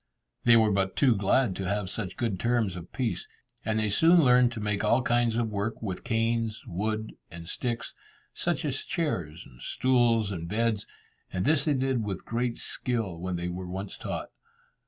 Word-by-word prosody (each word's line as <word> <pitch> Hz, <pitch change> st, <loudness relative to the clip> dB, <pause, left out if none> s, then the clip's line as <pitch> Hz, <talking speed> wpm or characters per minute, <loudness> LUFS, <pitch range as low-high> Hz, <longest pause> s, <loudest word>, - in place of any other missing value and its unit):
They 120 Hz, -1 st, +8 dB
were 110 Hz, -2 st, +4 dB
but 95 Hz, -1 st, 0 dB
too 130 Hz, -4 st, +5 dB
glad 100 Hz, +1 st, +2 dB
to 95 Hz, -, -3 dB
have 100 Hz, -1 st, -1 dB
such 95 Hz, 0 st, -4 dB
good 110 Hz, -6 st, -1 dB
terms 115 Hz, -5 st, +1 dB
of 85 Hz, -1 st, -9 dB
peace, 115 Hz, -10 st, -2 dB, 0.4 s
and 110 Hz, -1 st, 0 dB
they 110 Hz, -1 st, +1 dB
soon 165 Hz, -, +6 dB
learnt 125 Hz, -1 st, +5 dB
to 115 Hz, -, -5 dB
make 105 Hz, -1 st, -1 dB
all 115 Hz, +4 st, +3 dB
kinds 120 Hz, -2 st, +2 dB
of 115 Hz, -2 st, 0 dB
work 105 Hz, +2 st, -2 dB
with 95 Hz, -5 st, -4 dB
canes, 115 Hz, -1 st, 0 dB
wood, 110 Hz, +4 st, -2 dB, 0.2 s
and 85 Hz, 0 st, -9 dB
sticks, 120 Hz, +5 st, -3 dB, 0.4 s
such 170 Hz, -3 st, -1 dB
as 135 Hz, -3 st, -2 dB
chairs, 90 Hz, -, -2 dB
stools, 120 Hz, -5 st, +2 dB
and 85 Hz, -3 st, -4 dB
beds, 110 Hz, 0 st, 0 dB, 0.4 s
and 90 Hz, +2 st, -1 dB
this 150 Hz, -2 st, +3 dB
they 150 Hz, -2 st, +2 dB
did 130 Hz, -3 st, 0 dB
with 95 Hz, -3 st, -4 dB
great 120 Hz, +1 st, -1 dB
skill 115 Hz, -9 st, -3 dB
when 90 Hz, +1 st, -3 dB
they 85 Hz, 0 st, -2 dB
were 90 Hz, +1 st, -5 dB
once 95 Hz, +2 st, -5 dB
taught. -, -, -5 dB
110 Hz, 180 wpm, -28 LUFS, 95-120 Hz, 0.4 s, They